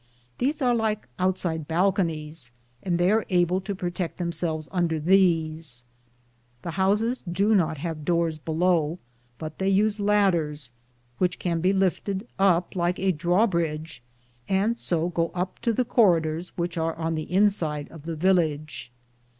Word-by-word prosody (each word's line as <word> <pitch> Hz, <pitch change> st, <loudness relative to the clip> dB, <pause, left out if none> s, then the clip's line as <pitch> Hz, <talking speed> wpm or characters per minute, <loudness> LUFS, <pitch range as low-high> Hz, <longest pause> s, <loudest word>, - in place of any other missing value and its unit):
These 285 Hz, +3 st, 0 dB
are 245 Hz, -1 st, +3 dB
like 220 Hz, -, -1 dB
outside 180 Hz, -4 st, -1 dB
bal 180 Hz, +4 st, +3 dB
conies, 160 Hz, -7 st, -3 dB, 0.3 s
and 175 Hz, -2 st, 0 dB
they 175 Hz, +2 st, +3 dB
are 220 Hz, 0 st, +3 dB
able 180 Hz, 0 st, +2 dB
to 200 Hz, +1 st, -4 dB
protect 175 Hz, -1 st, -4 dB
them 175 Hz, -1 st, -2 dB
selves 160 Hz, -2 st, -2 dB
under 170 Hz, -4 st, 0 dB
these. 160 Hz, -7 st, +1 dB, 0.8 s
The 170 Hz, -, -4 dB
houses 205 Hz, +7 st, +1 dB
do 200 Hz, +5 st, +2 dB
not 165 Hz, -6 st, +2 dB
have 155 Hz, 0 st, -5 dB
doors 170 Hz, -1 st, 0 dB
below, 165 Hz, 0 st, +1 dB, 0.4 s
but 155 Hz, +1 st, -7 dB
they 190 Hz, 0 st, +1 dB
use 210 Hz, +2 st, +2 dB
ladders, 170 Hz, -, +1 dB, 0.5 s
which 180 Hz, -1 st, +1 dB
can 170 Hz, -2 st, -1 dB
be 185 Hz, +2 st, +3 dB
lifted 195 Hz, +2 st, 0 dB
up 185 Hz, -1 st, +2 dB
like 175 Hz, 0 st, 0 dB
a 190 Hz, 0 st, +2 dB
drawbridge, 170 Hz, -, 0 dB, 0.5 s
and 200 Hz, +4 st, +2 dB
so 170 Hz, -6 st, -1 dB
go 170 Hz, -1 st, 0 dB
up 180 Hz, +1 st, -3 dB
to 235 Hz, -, +1 dB
the 245 Hz, +3 st, 0 dB
corridors 170 Hz, -7 st, +2 dB
which 170 Hz, -1 st, -2 dB
are 160 Hz, 0 st, -1 dB
on 165 Hz, 0 st, -2 dB
the 155 Hz, +1 st, -4 dB
inside 180 Hz, -7 st, +1 dB
of 160 Hz, -1 st, -12 dB
the 165 Hz, -, -3 dB
village. 155 Hz, -6 st, 0 dB
175 Hz, 155 wpm, -25 LUFS, 160-195 Hz, 0.8 s, are